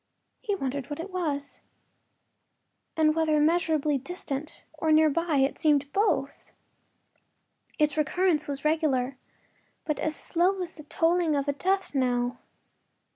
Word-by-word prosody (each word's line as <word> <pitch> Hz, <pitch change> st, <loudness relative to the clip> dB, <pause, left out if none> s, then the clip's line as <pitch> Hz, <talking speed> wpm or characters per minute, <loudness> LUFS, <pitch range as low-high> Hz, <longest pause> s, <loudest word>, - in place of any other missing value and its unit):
He 420 Hz, -5 st, -1 dB
wondered 275 Hz, -5 st, -4 dB
what 290 Hz, -, -5 dB
it 365 Hz, +4 st, -6 dB
was, 295 Hz, -6 st, -3 dB, 1.4 s
and 310 Hz, -1 st, +4 dB
whether 315 Hz, -1 st, +2 dB
immeasurably 310 Hz, -2 st, +2 dB
distant 295 Hz, -1 st, -6 dB
or 315 Hz, 0 st, -1 dB
near 310 Hz, 0 st, +5 dB
by— 335 Hz, +1 st, 0 dB
it 275 Hz, -, -4 dB
seemed 290 Hz, -2 st, +2 dB
both. 415 Hz, +3 st, 0 dB, 1.3 s
Its 300 Hz, -1 st, +2 dB
recurrence 310 Hz, +1 st, +1 dB
was 280 Hz, 0 st, -4 dB
regular, 280 Hz, -5 st, +1 dB, 0.7 s
but 300 Hz, -2 st, -2 dB
as 310 Hz, +1 st, -1 dB
slow 365 Hz, +3 st, +1 dB
as 340 Hz, -, -6 dB
the 305 Hz, -, -11 dB
tolling 330 Hz, 0 st, +1 dB
of 280 Hz, 0 st, -1 dB
a 285 Hz, -, +1 dB
death 380 Hz, +5 st, -1 dB
knell. 245 Hz, -2 st, 0 dB
305 Hz, 130 wpm, -27 LUFS, 285-335 Hz, 1.4 s, near